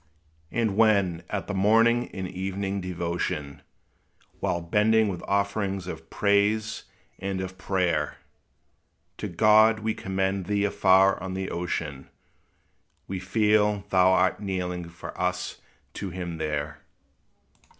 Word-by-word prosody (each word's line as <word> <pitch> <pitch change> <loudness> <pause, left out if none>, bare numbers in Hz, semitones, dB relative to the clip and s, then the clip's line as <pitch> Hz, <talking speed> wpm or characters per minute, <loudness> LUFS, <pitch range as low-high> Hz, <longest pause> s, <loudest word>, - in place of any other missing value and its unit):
And 110 -4 0
when 100 -6 +3
at 105 - -3
the 105 - -4
morning 115 +5 +3
and 95 -1 -5
evening 95 +1 -3
devotion, 85 -5 -3 0.8
While 85 - 0
bending 105 +5 +3
with 90 -3 -4
offerings 100 -1 0
of 80 -3 -8
praise 105 +2 +1 0.3
and 95 0 -3
of 95 0 -6
prayer, 85 -6 0 1.0
To 105 - -3
God 110 +4 +5
we 110 0 0
commend 95 -1 -2
thee 100 0 +1
afar 95 -1 +4
on 95 0 -4
the 95 0 -3
ocean, 80 -5 -4 1.0
We 95 -1 -4
feel 105 +1 +2
thou 95 -1 +5
art 95 0 +2
kneeling 90 -3 -3
for 85 0 -9
us 90 0 -2 0.3
to 100 - -5
him 85 -2 -5
there. 75 -1 -3
95 Hz, 120 wpm, -26 LUFS, 90-105 Hz, 1.0 s, God